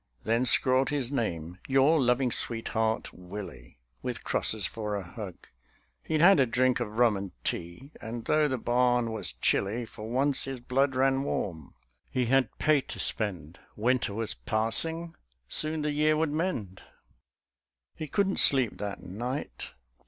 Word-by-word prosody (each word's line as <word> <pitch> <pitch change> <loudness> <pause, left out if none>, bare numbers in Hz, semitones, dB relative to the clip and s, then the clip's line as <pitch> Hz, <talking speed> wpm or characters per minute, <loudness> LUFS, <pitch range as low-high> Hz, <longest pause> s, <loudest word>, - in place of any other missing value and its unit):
Then 115 +4 +1
scrawled 130 +3 +4
his 140 -3 -1
name: 90 - -3
"Your 140 +4 +4
loving 125 0 +2
sweetheart, 110 -1 -1
Willie." 90 -10 -9 0.2
With - - -4
crosses 110 -3 +1
for 105 0 -3
a 100 - -3
hug. 95 0 -8 0.7
He'd 155 -1 -1
had 180 -1 +7
a 130 - +4
drink 125 +3 +2
Of 110 -2 -5
rum 120 -3 +4
and 100 -1 -5
tea; 85 - -4
and, 115 +1 -6
though 155 0 +3
the 130 -2 -1
barn 120 -1 +1
was 105 - -2
chilly, 100 - 0
For 110 0 -9
once 135 +2 +1
his 135 -1 -5
blood 130 +2 0
ran 135 +1 +2
warm; 85 - -4 0.3
he 125 -1 0
had 130 -1 +1
pay 150 -2 +3
to - - -9
spend. 90 -6 -2 0.2
Winter 120 -2 0
was 115 -1 -2
passing; 115 - -1 0.3
soon 155 - -3
the 150 - 0
year 155 +1 +2
would 160 -1 0
mend. 145 - -3 1.1
He 155 - -6
couldn't 195 +4 +1
sleep 130 -5 +6
that 100 -1 -5
night. 120 +10 -5
120 Hz, 150 wpm, -28 LUFS, 105-135 Hz, 1.1 s, had